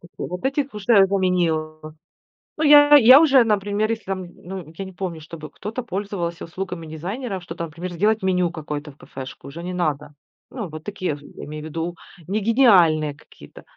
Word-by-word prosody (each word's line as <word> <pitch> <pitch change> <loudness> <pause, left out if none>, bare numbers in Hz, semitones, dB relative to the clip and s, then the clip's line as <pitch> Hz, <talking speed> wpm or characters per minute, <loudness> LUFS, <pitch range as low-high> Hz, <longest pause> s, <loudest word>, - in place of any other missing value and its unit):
такие. 175 - -8
Вот 180 +5 -7
этих 275 -1 -1
уже 205 -1 +4
заменил. 175 -5 0 0.8
Ну, 315 - -1
я 290 0 +8
я 255 +1 +9
уже, 275 -5 +6
например, 210 0 0
если 225 -2 -4
там, 190 -1 -4
ну, 180 -3 -9
я 195 - -5
не 190 - -10
помню, 175 -3 -5
чтобы 155 -1 -9
кто-то 225 +9 -6
пользовался 190 -5 -4
услугами 180 -1 -6
дизайнера, 190 - -5
что 175 - -9
там, 170 - -4
например, 170 +3 -7
сделать 210 +4 +1
меню 180 -2 +1
какое-то 150 -2 -6
в 135 - -23
кафешку, 135 -1 -10
уже 150 +5 -8
не 180 +1 -4
надо. 150 -5 -2 0.4
Ну, 225 -8 -5
вот 155 0 -9
такие 185 -6 -3
в 145 - -14
я 145 - -12
имею 150 0 -7
ввиду, 165 +2 -4 0.3
не 205 +3 0
гениальные 185 - +4
какие-то. - - -16
180 Hz, 185 wpm, -22 LUFS, 160-210 Hz, 0.8 s, я